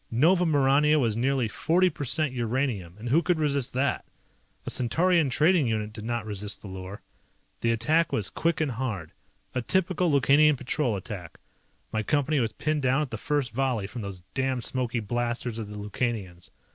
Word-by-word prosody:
Nova 170 +9 +3
Maurania 145 +1 +4
was 115 -5 +1
nearly 130 0 +1
40 175 - +2
percent 145 0 0
uranium, 120 -7 -2
and 115 +3 -6
who 155 +7 +4
could 175 -1 +1
resist 140 -4 0
that? 135 +2 0 0.6
A - - -1
Centaurian 165 +5 +3
trading 155 +1 +3
unit 110 -1 -2
did 105 - -8
not 120 -2 -2
resist 105 -1 -3
the - - -8
lure. 95 +1 -8 0.6
The 115 - 0
attack 150 +9 +2
was 105 -4 +1
quick 165 0 0
and 150 -4 0
hard. 110 -9 -4 0.4
A 125 - -1
typical 180 +5 +1
Lukanian 145 +2 +4
Patrol 125 -2 -1
attack. 90 -3 -8 0.5
My 110 - 0
Company 145 +4 +1
was 115 -3 0
pinned 155 -1 -1
down 130 +3 +2
at 140 - -7
the 110 - -3
first 145 -2 -1
volley 125 -4 -1
from 115 +4 -7
those 100 -3 -7
damned 130 -2 -1
smoky 125 -2 -1
blasters 120 +1 -2
of 110 - -5
the 105 0 -8
Lukanians. 105 -4 -4
125 Hz, 175 wpm, -27 LUFS, 110-150 Hz, 0.6 s, Maurania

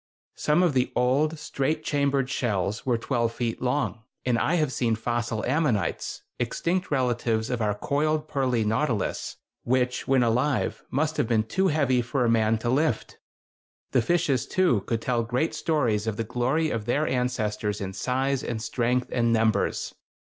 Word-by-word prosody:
Some 150 +4 +2
of 170 -5 +2
the 130 -1 +1
old 140 +6 +2
straight 155 +1 -2
chambered 140 -3 +1
shells 105 -3 -1
were 120 -2 +3
twelve 115 -1 -1
feet 115 -1 -3
long; 125 -2 -1 0.2
and 120 -2 +2
I 165 - +1
have 155 -6 +1
seen 115 -3 +1
fossil 120 0 -2
ammonites, 135 -6 0 0.2
extinct 170 +9 -1
relatives 120 -4 0
of 120 -2 -1
our 105 -1 +1
coiled 150 +6 0
pearly 125 -6 0
nautilus, 110 -1 -1 0.3
which 125 0 0
when 130 -2 +4
alive 125 +4 0
must 155 +3 0
have 145 -6 +1
been 110 -2 +2
too 190 - +1
heavy 140 -6 +2
for 125 +1 0
a - - +2
man 110 -1 +3
to - - +2
lift. 145 -2 0 0.7
The 130 - +3
fishes, 145 -2 +1
too, 180 - +2
could 115 -1 -1
tell 120 -2 +1
great 125 +7 -1
stories 120 -10 0
of 110 -2 -2
the 115 - -1
glory 130 +8 0
of 110 -2 -3
their 145 +6 +1
ancestors 110 -5 -1
in 95 -2 -4
size 130 +6 -1
and 115 -2 -3
strength 125 +2 0
and 115 -1 +2
numbers. 110 -1 +1
125 Hz, 165 wpm, -26 LUFS, 115-145 Hz, 0.7 s, when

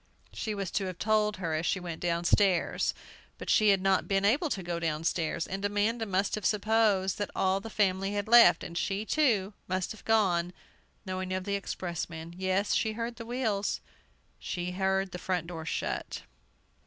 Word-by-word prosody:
She 215 -2 -3
was 195 -3 -3
to 195 - -1
have 185 -1 -6
told 210 0 +1
her 170 -4 -2
as 155 +1 -1
she 190 - +1
went 170 -2 -6
downstairs. 175 +2 +2 0.4
But - - -3
she 215 -2 +5
had 195 -2 +3
not 195 -1 +2
been 195 0 +1
able 285 - +2
to 195 -8 -3
go 170 -1 -3
downstairs! 165 +1 -1
And 195 +1 -5
Amanda 210 +3 0
must 195 +1 0
have 215 - -2
supposed 210 -2 +2
that 205 - -2
all 190 +1 +2
the 225 - -8
family 195 -2 +1
had 205 0 -2
left, 235 +1 +7
and 170 - -7
she, 195 +4 -1
too, 220 -9 +2
must 185 0 -1
have 220 - -10
gone, 180 -6 +2 0.5
knowing 185 0 -4
of 185 0 -2
the 200 - -3
expressman. 170 -4 -4
Yes, 190 +2 0
she 220 - +1
heard 230 +1 -4
the 230 -2 -8
wheels! 225 -5 -1 0.6
She 175 0 -4
heard 190 0 0
the 180 - -6
front 180 -3 -1
door 165 -2 -7
shut! - - -3
195 Hz, 180 wpm, -29 LUFS, 180-210 Hz, 0.6 s, left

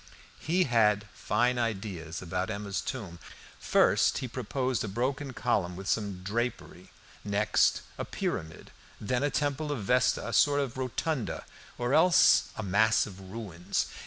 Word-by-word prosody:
He 180 +4 +2
had 105 - +2
fine 120 +4 +1
ideas 95 -8 -3
about 90 +2 -2
Emma's 100 -2 -3
tomb. 100 -10 -6 0.4
First - - +3
he 130 - -3
proposed 130 0 -2
a - - -3
broken 130 +6 -2
column 90 -6 0
with 95 +2 -8
some 100 -5 -1
drapery, 120 +5 -3 0.3
next 105 +1 +2 0.2
a - - -2
pyramid, 80 -1 -4 0.3
then 125 +4 -1
a 145 - +2
Temple 145 +1 -1
of 125 -8 -3
Vesta, 125 +1 +2
a 115 - -4
sort 145 -1 +4
of 135 -4 -2
rotunda, 130 +1 -3 0.3
or 120 +2 -1
else 170 +3 +6
a 110 - -3
"mass 105 +3 +3
of 95 -2 -10
ruins." 95 -5 -3
110 Hz, 145 wpm, -29 LUFS, 100-130 Hz, 0.4 s, else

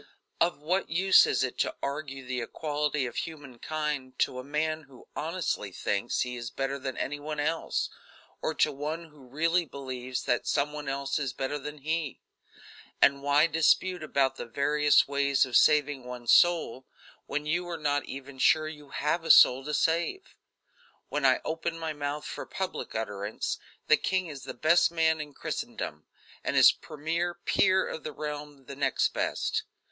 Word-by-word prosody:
Of 175 - +2
what 180 +5 0
use 185 +4 +6
is - - +1
it 130 - -3
to - - 0
argue 140 -2 -4
the 125 -1 -2
equality 150 +2 -1
of 120 - -6
human 145 -7 -6
kind 150 -4 -3
to 125 - 0
a - - -6
man 155 +2 -2
who 130 -3 -16
honestly 160 - -2
thinks 100 +5 -1
he 125 0 -2
is 120 -1 -5
better 135 +1 -3
than 130 -1 -5
any 145 +1 -3
one 150 +1 -5
else, 160 +3 -1 0.5
or - - -1
to - - +3
one 155 +4 -5
who 145 -4 -17
really 165 +6 +1
believes 130 -4 -5
that 125 - 0
some 145 +1 +1
one 150 -2 -5
else 140 +1 -1
is 135 -3 -2
better 140 +2 -3
than 150 +2 -7
he; 155 0 -2 0.8
and 140 0 +4
why 145 +2 +4
dispute 165 +3 +2
about 135 -3 +1
the - - -6
various 145 +4 +3
ways 140 -1 +2
of 125 -2 -5
saving 145 -3 +4
one's 125 -1 0
soul, 165 -7 +3 0.4
when 150 +1 -2
you 175 +3 -1
are 170 - -3
not 145 -2 0
even 135 0 -9
sure 155 +3 +4
you 150 -2 -10
have 150 +4 -1
a 165 - -6
soul 130 +2 +8
to 150 - -3
save? 170 - 0 0.7
When 145 -2 +2
I 130 - +3
open 165 +1 -2
my 160 -1 -3
mouth 145 0 -4
for - - -6
public 190 -1 -4
utterance, 105 -1 -3 0.3
the 155 - +5
king 185 -1 0
is 145 -5 -8
the - - -6
best 170 +3 +4
man 160 -2 +2
in 150 -2 -9
Christendom, 75 0 -5 0.4
and - - -1
his - - +8
premier 165 +3 -3
peer 190 -1 +3
of 160 - -6
the 155 - -4
realm 145 -1 -6
the 140 - -8
next 135 -2 +1
best. - - -1
145 Hz, 175 wpm, -28 LUFS, 135-160 Hz, 0.8 s, soul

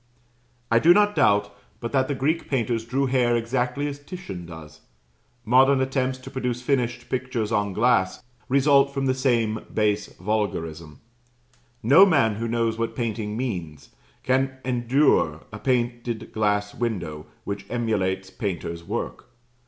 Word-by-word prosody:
I 115 - +5
do 170 +8 +6
not 205 0 +3
doubt 100 0 +2 0.2
but 115 - -5
that 130 -2 +2
the 145 - -2
Greek 155 +6 -1
painters 115 -4 -1
drew 135 +4 0
hair 125 -2 +2
exactly 125 +4 -1
as 145 -1 -4
Titian 145 - -8
does. 80 -3 -11 0.6
Modern 130 +4 +5
attempts 130 -1 0
to 130 +1 -11
produce 125 -3 -2
finished 120 -2 -1
pictures 125 -4 -2
on 105 -1 +1
glass 110 -2 +1 0.3
result 140 +1 +4
from 135 -1 -2
the 130 - +2
same 120 -4 +1
base 105 -1 +1
vulgarism. 85 -7 -3 0.8
No 140 - +8
man 140 - +3
who 115 +1 -2
knows 115 -1 0
what 115 0 -2
painting 110 -2 -3
means, 90 - -5 0.3
can 130 +1 +1
endure 120 - +2
a 110 - -6
painted 120 -2 -2
glass 105 -1 0
window 85 -11 -4 0.2
which 100 -1 -5
emulates 95 -5 -1
painter's 85 -6 -4
work. - - -5
120 Hz, 140 wpm, -24 LUFS, 105-130 Hz, 0.8 s, No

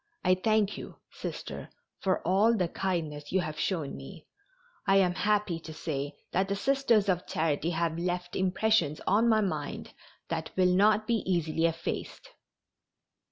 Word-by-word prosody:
I 185 - +6
thank 210 +2 +1
you, - - -9 0.2
Sister, - - -6 0.3
for 190 -1 0
all 210 +5 +4
the 180 -3 +1
kindness 160 -5 -3
you 190 - +2
have 155 -3 -5
shown 165 -7 -1
me. - - -10 0.6
I 195 - +5
am 185 -2 +4
happy 205 -3 +1
to 160 -1 -9
say 145 -2 -3 0.2
that 190 +2 +1
the 200 - -1
Sisters 240 -3 +2
of 180 -2 0
Charity 160 0 0
have 165 -1 -1
left 175 0 -2
impressions 190 -4 +2
on 220 +5 +3
my 220 -1 +4
mind 155 -8 -3 0.4
that 160 -1 -3
will 180 -1 +4
not 210 +3 +4
be 230 +1 +2
easily 165 -1 +1
effaced." 170 - -4
180 Hz, 155 wpm, -29 LUFS, 165-205 Hz, 0.6 s, I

